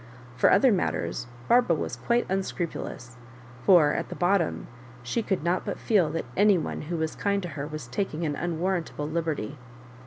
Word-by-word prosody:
For - - +4
other 265 -2 +6
matters 150 - -1 0.2
Barbara 240 -8 +4
was - - -3
quite 240 0 0
unscrupu 190 -3 -2
lous, 125 +1 -10 0.5
for 165 -6 +6
at - - -3
the - - -6
bottom 175 -1 +1 0.4
she 120 - -1
could 190 -7 -1
not 175 +2 +1
but - - -4
feel 195 -8 +2
that 165 +2 -3
any 205 -1 +5
one 160 - -3
who 175 - -1
was 160 -1 -2
kind 200 -1 0
to 175 - -4
her 145 -2 -5
was 155 -3 -6
taking 155 +5 -3
atf 155 -3 0
^ 145 - -5
unwarrantable 175 -3 -2
liberty. 155 -5 -3
170 Hz, 185 wpm, -27 LUFS, 155-195 Hz, 0.5 s, other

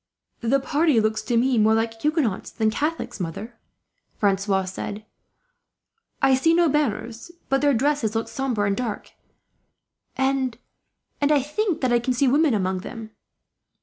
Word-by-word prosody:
"The 250 +4 +2
party 295 -1 +2
look 215 0 +1
to 230 +2 -1
me 250 0 +2
more 220 +1 +4
like 225 0 -2
Huguenots 300 - 0
than 220 -1 0
Catholics, 245 -4 -3
mother," 195 +7 -5 0.6
Francois 195 -2 +1
had 185 - -5
said. 205 +3 -6 1.2
"I 270 -1 +5
see 325 +6 +3
no 345 0 +4
banners; 240 - -2 0.2
but 270 0 +2
their 285 -2 +3
dresses 255 -3 0
look 225 - -1
sombre 250 -6 -1
and 200 0 +1
dark, 235 -3 -4 1.1
and 265 -3 0 0.6
I 285 -1 +3
think 350 +5 -1
that 255 -2 +1
I 240 - +4
can 250 +2 -1
see 270 +2 +2
women 285 -1 +3
among 185 -2 -1
them." 220 +3 -8
240 Hz, 150 wpm, -23 LUFS, 215-280 Hz, 1.2 s, I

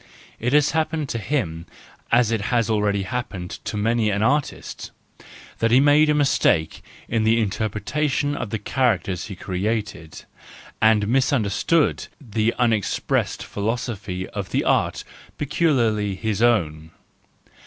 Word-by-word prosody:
— - - -26
It 125 +2 -1
has 150 -1 +4
happened 155 -2 -1
to 115 - -2
him 95 - -2 0.4
as 120 -1 +4
it 115 -3 0
has 115 -3 +1
already 105 -2 +1
happened 95 -5 -5
to 105 - -3
many 115 +1 +1
an 100 +1 0
artist: 145 +4 -1 0.7
he 115 +3 +4
made 145 +2 +5
a 150 - +3
mistake 105 - +2 0.3
in 115 -1 0
the 110 +1 +3
interpretation 115 +8 -1
of 110 - -4
the 110 - -2
characters 100 -8 -1
he 100 - -7
created, 95 -3 -4 0.6
and 110 -2 +4
misunderstood 130 +4 +1
the 115 -3 0
unexpressed 115 -5 0
philosophy 105 -4 -4
of 100 -2 -5
the - - 0
art - - +1 0.3
peculiarly 115 - +1
his 110 +1 -2
own. 80 -10 +1
110 Hz, 130 wpm, -22 LUFS, 100-130 Hz, 0.7 s, made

